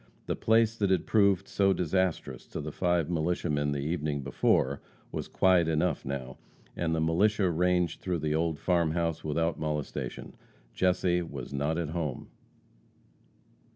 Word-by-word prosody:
The - - -1
place 115 0 +3
that 100 -3 +1
had 95 -3 +2
proved 100 -3 +3
so 95 -1 +2
disastrous 90 0 -1
to - - -6
the 75 +1 -5
five 85 -1 +1
militiamen 80 -3 0
the 70 -1 -2
evening 75 -1 -2
before, 70 0 +1 0.3
was - - -4
quiet 90 -3 +3
enough 80 +2 0
now, 65 -2 -5 0.4
and 80 -1 -1
the - - 0
militia 95 +6 +2
ranged 90 +1 +1
through 90 -2 -1
the 75 -1 -1
old 80 0 0
farm 85 0 +1
house 85 -1 -1
without 80 +2 -1
molestation. 75 -2 -4 0.4
Jesse 90 -1 +2
was 70 -6 -7
not 75 +4 -1
at 85 -3 -2
home! 80 -5 -4
85 Hz, 150 wpm, -29 LUFS, 75-90 Hz, 0.4 s, place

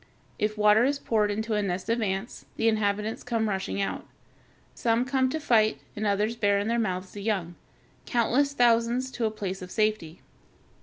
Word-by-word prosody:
If 210 0 -1
water 210 +2 +5
is 280 +2 +1
poured 215 -6 +1
into 220 +2 -2
a 210 - +1
nest 185 -2 -3
of 230 +1 0
ants, 195 +2 -3
the 225 - +1
inhabitants 215 0 0
come 230 -2 -1
rushing 195 -1 -2
out. 195 - -3 0.7
Some 230 +1 +1
come 260 0 +1
to 315 - -2
fight, 220 -7 +3 0.2
and 210 0 -2
others 210 +3 +1
bear 205 -3 +2
in 200 +1 -1
their 235 +1 +1
mouths 185 -4 -2
the 205 - -8
young 195 -5 -1 0.5
(Fig. - - -10
244), 240 -1 +4
countless 280 +5 +1
thousands, 240 +1 +2
to 240 - -2
a - - +2
place 195 -3 -5
of 180 - -8
safety. 210 -6 -1
215 Hz, 195 wpm, -27 LUFS, 200-235 Hz, 0.7 s, water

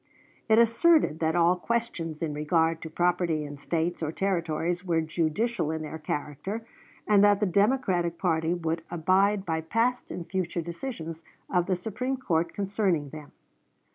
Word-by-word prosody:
It 220 - +6
asserted 235 - +4
that 160 0 +1
all 175 +1 +4
questions 180 -7 -3
in 155 -2 -2
regard 160 +2 +1
to 160 - -6
property 170 -1 +1
in 145 -1 -8
States 170 +3 -1
or 155 -1 -1
Territories 175 -1 -1
were 170 -3 +1
judicial 160 +5 -1
in 160 0 -3
their 160 +1 -6
character, 150 +9 -4 0.4
and 205 -1 +5
that 205 -1 +5
the 210 - +2
Democratic 190 -4 +1
party 165 -1 +1
would 165 -1 -2
abide 190 +4 +2
by 160 -2 -1
past 230 +9 0
and 175 -2 -6
future 175 -3 -2
decisions 170 -2 -6 0.3
of 180 -2 +2
the 190 - +2
Supreme 225 +8 -3
Court 170 -9 0
concerning 195 -7 0
them. 150 0 -10
175 Hz, 155 wpm, -27 LUFS, 160-200 Hz, 0.4 s, It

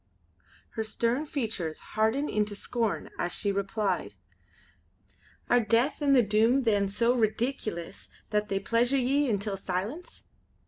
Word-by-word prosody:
Her 225 - -3
stern 235 +6 0
features 220 - -3 0.2
hardened 220 +7 +1
into 210 -1 0
scorn 225 +1 -2
as 175 - -1
she 200 - 0
replied: 200 +1 -1 1.3
"Are 245 - +4
Death 235 +6 +1
and 280 -1 +4
the 250 - +6
Doom 225 +6 +3
then 205 -4 +2
so 230 +5 +2
redeekulous 220 -5 -2 0.2
that 210 0 0
they 195 - 0
pleasure 235 +6 +1
ye 270 +2 +2
intil 200 -2 -1
silence?" 200 - -5
220 Hz, 130 wpm, -28 LUFS, 205-245 Hz, 1.3 s, the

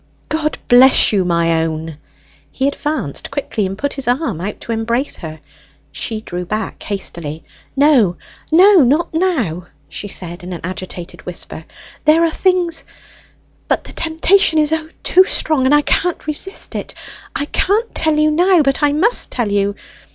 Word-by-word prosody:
"God 310 -1 -1
bless 250 -1 +6
you, 195 -2 +2
my 170 -2 +1
own!" 160 -1 -5 0.5
He 270 - -1
advanced 280 - -3
quickly, 260 -7 -2
and 195 +1 -6
put 285 +5 -2
his 275 -2 -5
arm 250 - -1
out 205 +3 -5
to - - -6
embrace 235 +4 -1
her. 160 -2 -8 0.5
She 220 -2 -3
drew 180 -4 -5
back 215 +5 -4
hastily. 170 -6 -5 0.3
"No 265 - +4 0.3
no, 370 +3 +7
not 295 +7 +1
now!" 250 - -1 0.2
she 205 - -6
said 175 -2 -7
in 180 +1 -6
an 170 - -7
agitated 180 -1 -7
whisper. - - -4 0.4
"There 315 +2 +5
are 330 - +2
things; 355 -2 +1 0.8
but - - 0
the - - -11
temptation 325 +2 +2
is, 305 0 +2
O, 320 0 -2
too 370 - +5
strong, 310 -7 +1
and 290 - +5
I 295 - +3
can't 355 +3 0
resist 310 +6 -3
it; - - -6 0.4
I 285 - -1
can't 425 +9 0
tell 315 -1 +1
you 305 0 +3
now, 350 +1 +4
but 275 +1 0
I 290 -1 +3
must 410 +11 +2
tell 235 -5 -2
you! 200 0 0
270 Hz, 165 wpm, -17 LUFS, 190-315 Hz, 0.8 s, no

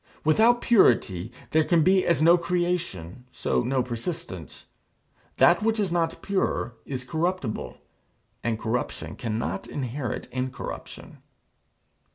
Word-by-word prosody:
Without 225 +10 +4
purity 110 - +3 0.2
there 160 0 +4
can 165 0 +3
be 185 +1 +3
as 170 -2 +3
no 170 +2 +7
creation 170 - -2
so - - 0
no 125 +1 0
persistence. 115 - -6 0.7
That 175 +3 +5
which 220 0 +1
is 195 -4 0
not 165 -1 -1
pure 190 -10 -1
is 130 -2 -4
corruptible, 160 -4 -2 0.7
and 115 -2 0
corruption 115 +3 -3
cannot 105 -6 -3
inherit 130 -2 -4
incorruption. 130 +1 -6
145 Hz, 115 wpm, -26 LUFS, 120-175 Hz, 0.7 s, no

